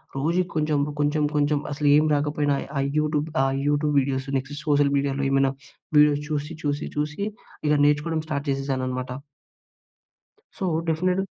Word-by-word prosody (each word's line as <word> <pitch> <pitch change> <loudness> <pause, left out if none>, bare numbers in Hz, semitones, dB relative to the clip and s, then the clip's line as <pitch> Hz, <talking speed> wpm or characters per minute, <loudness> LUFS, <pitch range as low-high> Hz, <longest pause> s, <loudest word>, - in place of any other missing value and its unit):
రోజుకి 170 +6 0
కొంచెం, 150 -1 +1 0.2
కొంచెం, 145 +1 +1
కొంచెం 145 0 +2
అసలు 145 0 -1
ఏం 150 +1 +4
రాకపోయినా, 145 0 0 0.2
ఆ - - +1 0.2
యూట్యూబ్ 150 0 0 0.2
ఆహ్, 135 0 +1
యూట్యూబ్ 145 0 +1
వీడియోస్ 135 0 -2
నెక్స్ట్ 135 +2 -5
సోషల్ 145 -1 +3
మీడియాలో 140 0 0
ఏమైనా 135 0 +3 0.5
వీడియోస్ 150 0 +5
చూసి, 150 +1 -2
చూసి, 145 -1 -1
చూసి 150 +4 -2 0.5
ఇక 150 - +4
నేర్చుకోవడం 155 +2 +1
స్టార్ట్ 145 -2 -3
చేసేశాననమాట. 130 -2 -2 1.5
So, - - -5 0.2
definite 180 +3 +1
145 Hz, 140 wpm, -24 LUFS, 140-150 Hz, 1.5 s, వీడియోస్